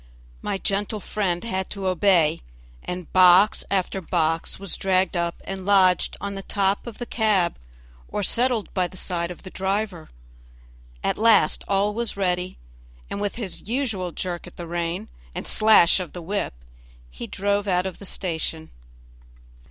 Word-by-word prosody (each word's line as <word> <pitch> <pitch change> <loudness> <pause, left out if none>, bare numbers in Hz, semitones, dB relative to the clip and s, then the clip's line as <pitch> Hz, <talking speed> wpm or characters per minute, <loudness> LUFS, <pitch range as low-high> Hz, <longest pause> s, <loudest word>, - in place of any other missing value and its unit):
My - - -2
gentle 205 +2 -1
friend 190 -4 -2
had 190 -5 -3
to 200 -2 -5
obey, 185 - +3 0.4
and 180 -2 -6
box 185 +3 +6
after 190 0 0
box 165 -1 0
was 195 -3 -4
dragged 190 -1 +1
up 170 0 -1
and 195 -1 -5
lodged 185 -2 +3
on 200 0 -4
the 195 - -5
top 195 +2 0
of 230 - -7
the 240 - -5
cab 210 -7 +1 0.5
or 205 - -3
settled 240 +1 +1
by 185 -2 +1
the 185 - -11
side 170 -2 -2
of 180 - -9
the 185 - -9
driver. 190 -3 -2 0.9
At - - 0
last 225 -1 +4
all 200 +1 +2
was 230 -1 -2
ready, 180 -1 -1 0.5
and 200 - -3
with 205 -1 -2
his 205 -6 -6
usual 225 -9 -1
jerk 175 0 -5
at - - -14
the 175 - -6
rein 170 +1 -3 0.3
and - - -4
slash 215 -5 +6
of 180 -3 -6
the 175 - -6
whip 200 - -2 0.6
he - - -7
drove 205 +1 -1
out 180 -1 +2
of 190 - -5
the 200 - -7
station. 160 -4 -3
190 Hz, 160 wpm, -24 LUFS, 180-205 Hz, 0.9 s, box